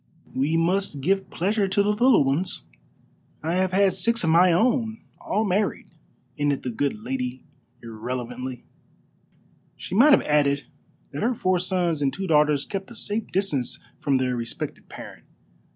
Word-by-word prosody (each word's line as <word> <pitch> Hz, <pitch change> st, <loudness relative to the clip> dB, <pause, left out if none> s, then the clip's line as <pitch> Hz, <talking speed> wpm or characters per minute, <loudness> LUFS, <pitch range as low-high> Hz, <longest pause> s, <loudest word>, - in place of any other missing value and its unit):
We 145 Hz, +5 st, +1 dB
must 175 Hz, -2 st, 0 dB
give 190 Hz, +7 st, 0 dB
pleasure 200 Hz, +3 st, 0 dB
to 200 Hz, +2 st, +2 dB
the 205 Hz, -, 0 dB
little 240 Hz, -, +4 dB
ones. 140 Hz, +7 st, -1 dB, 0.8 s
I 165 Hz, +2 st, -1 dB
have 185 Hz, +1 st, +1 dB
had 195 Hz, 0 st, +3 dB
six 230 Hz, +1 st, +1 dB
of 160 Hz, -, +2 dB
my 175 Hz, +2 st, +6 dB
own, 225 Hz, +4 st, +2 dB, 0.2 s
all 215 Hz, -, -1 dB
married," 200 Hz, +1 st, -1 dB, 0.5 s
ended 145 Hz, -1 st, 0 dB
the 125 Hz, -, -3 dB
good 115 Hz, -2 st, -2 dB
lady 130 Hz, 0 st, -3 dB, 0.4 s
irrelevantly. 125 Hz, +2 st, -5 dB, 1.1 s
She -, -, -7 dB
might 270 Hz, +9 st, +7 dB
have -, -, +5 dB
added 140 Hz, -2 st, +2 dB, 0.5 s
that 145 Hz, -, -5 dB
her 240 Hz, +3 st, +1 dB
four 185 Hz, -3 st, +1 dB
sons 175 Hz, -4 st, 0 dB
and 140 Hz, -1 st, +2 dB
two 195 Hz, -, -5 dB
daughters 150 Hz, -4 st, +3 dB
kept 195 Hz, +1 st, -5 dB
at -, -, -10 dB
a 230 Hz, -, -5 dB
safe 215 Hz, +1 st, -2 dB
distance 170 Hz, -10 st, -1 dB, 0.2 s
from 140 Hz, -, +1 dB
their 130 Hz, -1 st, +1 dB
respected 115 Hz, -1 st, -6 dB
parent. -, -, -10 dB
170 Hz, 160 wpm, -24 LUFS, 140-195 Hz, 1.1 s, might